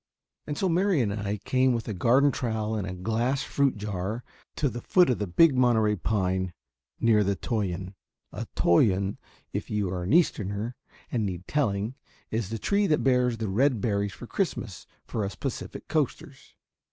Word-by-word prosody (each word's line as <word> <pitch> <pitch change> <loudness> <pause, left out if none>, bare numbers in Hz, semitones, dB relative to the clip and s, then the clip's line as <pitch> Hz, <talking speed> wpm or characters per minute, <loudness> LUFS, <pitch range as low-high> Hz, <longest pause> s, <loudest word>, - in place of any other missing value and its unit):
And 145 -1 -3
so 190 - +1
Mary 185 0 +2
and 105 -4 0
I 105 0 -2
came 130 +5 +2
with 115 -2 -3
a 110 - -2
garden 125 +9 +4
trowel 110 -4 -2
and 100 -3 -2
a 95 - -5
glass 115 +8 0
fruit 140 -5 +1
jar 105 +2 -3 0.3
to 145 - +1
the 120 -2 -4
foot 180 0 +4
of 125 - -1
the 105 - -1
big 155 - +5
Monterey 115 -4 +3
pine 95 -2 -1 0.5
near 110 -2 +4
the 100 0 +1
toyon. 95 -4 -3 0.4
A - - -6
toyon, 95 +2 +3 0.3
if - - -3
you 105 -4 -1
are 90 -1 -3
an 90 +4 -2
Easterner 110 - +1 0.4
and 115 -3 0
need 90 -3 -4
telling, 110 -6 0 0.4
is 110 -3 -1
the 115 - -3
tree 200 - +1
that 150 - +2
bears 125 -3 +3
the 110 -1 -2
red 120 +5 +2
berries 100 -2 0
for - - -9
Christmas 120 - -3 0.2
for 110 - -3
us 100 -1 -4
Pacific - - -5
Coasters. - - -3
110 Hz, 175 wpm, -27 LUFS, 100-125 Hz, 0.5 s, big